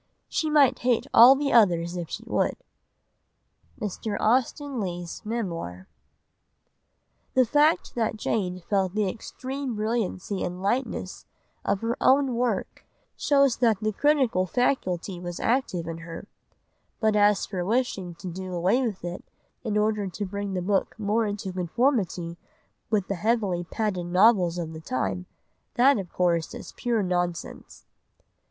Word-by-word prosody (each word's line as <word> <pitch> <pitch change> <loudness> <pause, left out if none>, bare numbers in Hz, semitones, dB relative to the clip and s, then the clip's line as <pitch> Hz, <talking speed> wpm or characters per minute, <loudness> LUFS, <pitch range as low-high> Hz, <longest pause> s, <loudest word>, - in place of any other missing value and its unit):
She 315 - -1
might 280 -4 +4
hate 245 -2 +1
all 245 +4 +9
the 280 0 -1
others 175 -6 +4
if 170 -3 -5
she - - -6
would." - - 0 1.2
(Mr. 210 0 -3
Austen 260 +4 +1
Leigh's 175 -3 -4
Memoir.) 170 - -4 1.5
The 255 -1 +5
fact 295 +7 +2
that 225 -2 -1
Jane 185 -5 -2
felt 195 -2 0
the 210 -2 +1
extreme 260 +5 -5
brilliancy 210 -3 -2
and 180 +1 -3
lightness 235 +8 -2 0.4
of 200 -1 0
her 230 +1 -1
own 270 -1 +4
work 235 -5 -2 0.3
shows 275 -4 +3
that 225 -5 +3
the 215 0 0
critical 260 -8 +2
faculty 190 -7 -1
was 175 -1 -6
active 230 -9 0
in 165 0 -5
her, 165 +3 -9 0.7
but 220 -2 +2
as 205 -1 +4
for 185 -4 -3
wishing 195 -5 -1
to 185 +2 -9
do 185 +1 -5
away 185 +9 +2
with 215 -8 -3
it 175 +1 -5 0.4
in 215 -3 -1
order 210 -1 +1
to 200 +4 -4
bring 200 0 -4
the 180 - -2
book 195 +1 0
more 215 +1 +1
into 205 -2 -4
conformity 180 - 0 0.5
with 210 -4 +1
the - - -1
heavily 195 -2 0
padded 185 -2 -2
novels 180 -1 +4
of 165 -2 -4
the 160 - -8
time, 95 - -2 0.5
that 260 0 +5
of 185 -3 -7
course 170 -2 0
is - - -9
pure 235 -4 0
nonsense. 175 -2 -3
205 Hz, 145 wpm, -26 LUFS, 180-235 Hz, 1.5 s, all